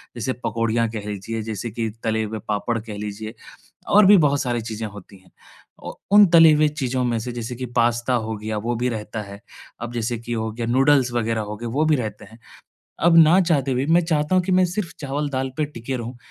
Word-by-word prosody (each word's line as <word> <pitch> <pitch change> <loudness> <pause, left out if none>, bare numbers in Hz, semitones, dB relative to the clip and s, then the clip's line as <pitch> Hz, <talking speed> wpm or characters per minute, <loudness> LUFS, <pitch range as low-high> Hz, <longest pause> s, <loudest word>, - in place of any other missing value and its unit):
जैसे 130 +2 -2
पकोड़ियाँ 115 0 0
कह 105 -2 -6
लीजिए, 110 +3 -4
जैसे 110 +1 -5
कि 115 0 -3
तले 110 -1 0
हुए 110 0 -5
पापड़ 110 +2 -1
कह 105 -1 -8
लीजिए, 105 +2 -6 0.5
और 205 0 +6
भी 200 0 +8
बहुत 145 -3 +2
सारी 120 -3 -1
चीजें 110 0 -5
होती 100 -1 -13
हैं। 95 - -25 0.5
औ - - -6 0.2
उन 205 0 +8
तली 165 -2 +8
हुए 150 0 +3
चीज़ों 130 -4 -2
में 120 -1 0
से 120 +2 -5
जैसे 120 +1 -5
कि 130 +1 -5
पास्ता 120 +1 +2
हो 110 -2 -1
गया, 110 +1 -4
वो 115 +3 -2
भी 125 +2 -1
रहता 105 -1 -5
है। 100 0 -10 0.4
अब 120 0 -5
जैसे 120 0 -2
कि 120 +1 -5
हो 110 -1 -2
गया 115 +1 -4
नूडल्स 130 0 +3
वग़ैरह 115 -2 -1
हो 105 0 -6
गए 120 - -8
वो 140 +7 0
भी 155 -1 +3
रहते 110 -5 -5
हैं। 110 +3 -16 0.7
अब 170 0 +5
ना 165 +3 +7
चाहते 145 -7 +1
हुए 130 +2 0
मैं 170 +3 +4
चाहता 155 +1 +1
हूँ 185 - +3
कि 185 - -2
मैं 185 0 +4
सिर्फ़ 180 0 -4
चावल-दाल 140 -2 -2
पर 155 - +1
टिके 130 -2 -6
रहूँ, 120 +1 -7
120 Hz, 225 wpm, -22 LUFS, 110-145 Hz, 0.7 s, भी